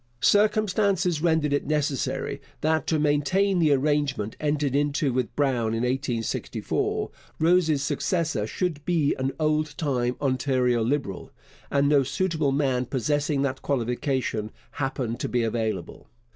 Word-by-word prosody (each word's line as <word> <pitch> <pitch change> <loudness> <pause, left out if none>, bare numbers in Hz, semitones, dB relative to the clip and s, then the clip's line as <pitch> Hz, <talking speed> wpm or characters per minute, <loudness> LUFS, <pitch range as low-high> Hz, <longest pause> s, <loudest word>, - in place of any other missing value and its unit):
Circumstances 200 -2 +2
rendered 160 -3 +2
it 145 - 0
necessary 150 -3 -1 0.2
that, 160 0 +1
to 160 - +2
maintain 155 +6 +2
the 155 -3 +4
arrangement 140 -5 +1
entered 145 -2 0
into 145 -1 +1
with 125 -1 -2
Brown 120 -6 +1
in 115 - -1
1864, 125 -2 -2 0.3
Rose's 160 -3 +3
successor 160 - -1
should 160 +1 -2
be 160 -4 +2
an 130 +1 0
old 155 0 0
time 125 -5 0
Ontario 130 -3 +1
Liberal, 120 -6 -2 0.4
and 140 0 +2
no 145 -1 +5
suitable 155 +1 0
man 135 -3 0
possessing 145 +2 0
that 130 -1 -2
qualification 125 -3 -1 0.2
happened 130 -4 -3
to - - -2
be 120 -1 +1
available. 110 -5 -3
145 Hz, 130 wpm, -25 LUFS, 130-155 Hz, 0.4 s, no